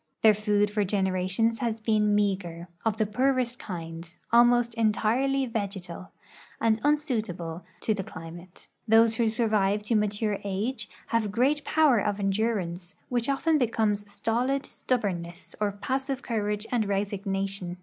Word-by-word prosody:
Their 220 -1 +8
food 210 0 +1
for 210 0 +1
generations 190 +3 +1
has 230 -3 -1
been 215 -1 +2
mea 205 -1 +3
ger, 170 -2 -9 0.2
of 220 -1 0
the 215 - +2
poorest 250 +2 0
kind, 165 -2 -7 0.2
almost 240 0 +5
entirely 230 +5 +1
vegetal, 195 -6 -5 0.5
and 225 -1 +2
unsuitable 215 - -1 0.2
to 220 - +2
the 200 -2 -3
climate. 170 +2 -10 0.2
Those 225 0 +5
avIio 230 -2 +2
survive 210 -3 +1
to 225 +2 0
mature 210 0 0
age 215 +4 -3 0.2
have 225 -3 +1
great 270 +7 +2
})OAver 300 -9 +4
of 205 -1 -1
endurance, 195 -3 -1 0.2
Avhich 245 +2 +1
often 310 +3 +2
becomes 210 -4 0
stolid 250 +6 0
stubbornness 180 -8 -3
or 205 -1 +2
passive 265 +6 -3
courage 210 -2 -2
and 230 -4 +1
resignation. 195 -2 -2
210 Hz, 140 wpm, -27 LUFS, 195-235 Hz, 0.5 s, Their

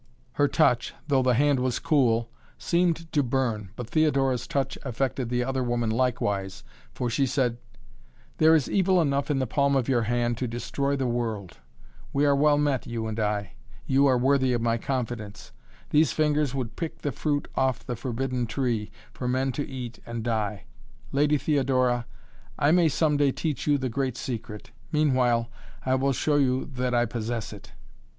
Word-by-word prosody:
Her 145 - +2
touch, 125 -7 +2
though 135 -3 +3
the 125 -1 +3
hand 145 +1 +3
was 125 -1 0
cool, 115 -6 +2 0.3
seemed 170 -2 0
to 145 - +3
burn, 120 -6 -1
but 125 - -6
Theodora's 135 -4 +1
touch 140 -1 -1
affected 130 -1 -2
the 125 0 0
other 135 +1 -1
woman 120 -2 0
likewise 105 -5 -1 0.3
for 125 - -3
she 125 +3 +1
said: 120 -2 0 0.8
"There 160 +1 +6
is 150 -5 +2
evil 190 -1 +3
enough 140 -3 +1
in 145 - +1
the 130 - +1
palm 140 +3 +1
of 130 -3 +1
your 125 -3 +2
hand 120 +1 0
to 125 - -1
destroy 140 +4 -2
the 135 -1 -1
world! 115 -6 -3 0.5
We 140 +1 +2
are 140 -1 +4
well 145 +1 +4
met, 145 -3 0
you 115 -1 -3
and 110 0 -4
I. 105 -3 -1 0.3
You 140 +1 +4
are 130 -2 +4
worthy 130 0 +2
of 120 - 0
my 115 0 +1
confidence. 120 -5 -4 0.4
These 150 -3 +4
fingers 150 -3 +1
would 125 -4 -4
pick 165 -2 -5
the 145 - 0
fruit 145 +3 -1
off 130 -2 0
the 120 - -3
forbidden 125 0 -2
tree, 115 -3 -1 0.2
for 125 - -4
men 130 +2 +1
to 145 +4 -4
eat 125 -4 -7
and 120 -1 -5
die! 105 -4 -2 0.5
Lady 150 +2 +3
Theodora 130 -4 +1 0.5
I 145 - +3
may 170 -1 +4
some 150 0 +1
day 145 -1 +3
teach 150 -1 -3
you 145 -1 +4
the 130 -1 -2
great 130 0 -2
secret 110 -4 -6 0.2
meanwhile 125 -6 +2 0.3
I 130 - +2
will 135 +1 +2
show 145 +3 +1
you 130 -2 +2
that 125 -1 -1
I 120 0 +3
possess 115 -1 -4
it!" 100 - -13
130 Hz, 180 wpm, -26 LUFS, 120-140 Hz, 0.8 s, There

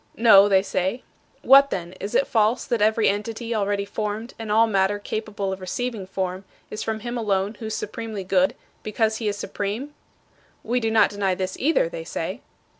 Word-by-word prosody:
"No," 205 -3 +7
they 190 -1 +4
say. 190 +4 -2 0.4
"What 275 +1 +7
then? 175 -5 -4
Is 200 - -5
it - - +4
false 225 +2 +1
that 235 -4 -1
every 220 +1 +3
entity 225 +3 -2
already 200 -2 0
formed 215 +3 -4
and 220 -2 -5
all 225 +2 +5
matter 200 -2 +1
capable 205 -1 -4
of 190 - -8
receiving 215 +1 -4
form 185 0 -3 0.3
is 210 - -5
from 220 -1 -3
him 240 +1 -4
alone 200 -2 0
who 220 - -5
is 220 - -3
supremely 215 -2 -5
good, 185 0 +2 0.3
because 220 +1 0
he 220 - -3
is 205 -1 -1
supreme?" 210 +9 -4 0.7
"We 245 +3 0
do 225 -2 -1
not 220 -1 +4
deny 200 -2 0
this, 185 0 -3
either," 330 - +2
they - - -7
say. - - -5
215 Hz, 190 wpm, -23 LUFS, 195-230 Hz, 0.7 s, No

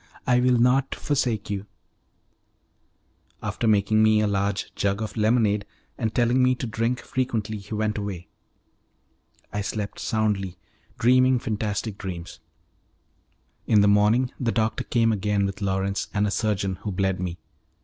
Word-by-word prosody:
I 125 -1 +4
will 125 0 +3
not 125 +3 +2
forsake 120 -8 -1
you" 100 0 -4 1.8
After 115 - -2
making 110 0 +3
me 110 0 +5
a 105 - +2
large 100 -1 -1
jug 100 0 0
of 110 -1 -4
lemonade, 110 -2 +2 0.3
and 110 -3 -2
telling 120 +3 +2
the 130 0 +4
to 125 - -4
drink 115 +2 -1
frequently, 110 -4 -2
he 100 +2 -7
went 105 0 -1
away. 95 -4 -5 1.3
I 105 - -1
slept 100 +1 -4
soundly, 105 -4 -1 0.4
dreaming 130 +2 +4
fantastic 105 -2 -3
dreams. 90 -3 -6 1.3
In 110 - +5
he - - +4
morning 105 +5 +3
the 120 -3 0
doctor 110 -1 0
came 115 -2 +2
again 105 -1 0
with 100 +1 -5
Lawrence 100 +1 -1
and 105 +1 +2
a 105 - -1
surgeon, 100 -4 -1
who 105 - -5
bled 95 -1 0
me. 90 -1 -3
105 Hz, 145 wpm, -25 LUFS, 100-115 Hz, 1.8 s, me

